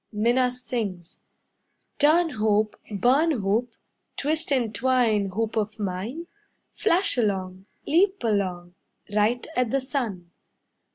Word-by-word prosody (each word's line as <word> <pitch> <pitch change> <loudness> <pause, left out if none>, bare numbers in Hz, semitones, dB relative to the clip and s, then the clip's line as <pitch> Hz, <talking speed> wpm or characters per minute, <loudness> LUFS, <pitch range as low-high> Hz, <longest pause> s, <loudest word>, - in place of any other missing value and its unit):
Minna 240 +4 +2
sings: 225 -8 -5 0.8
"Turn, 320 +3 +4
hoop, 215 -1 +1 0.2
Burn 255 - +3
hoop, 230 -2 0 0.4
Twist 310 +2 0
and 240 -5 +1
twine 230 -4 +2
Hoop 220 +3 -2
of 215 -1 -1
mine. 210 - -4 0.5
Flash 375 - +1
along, 190 -3 -2 0.2
Leap 380 +5 +2
along, 185 -5 -1 0.4
Right 215 +4 +1
at 250 -1 +1
the 275 - +1
sun. 230 - -4
225 Hz, 110 wpm, -25 LUFS, 205-260 Hz, 0.8 s, Turn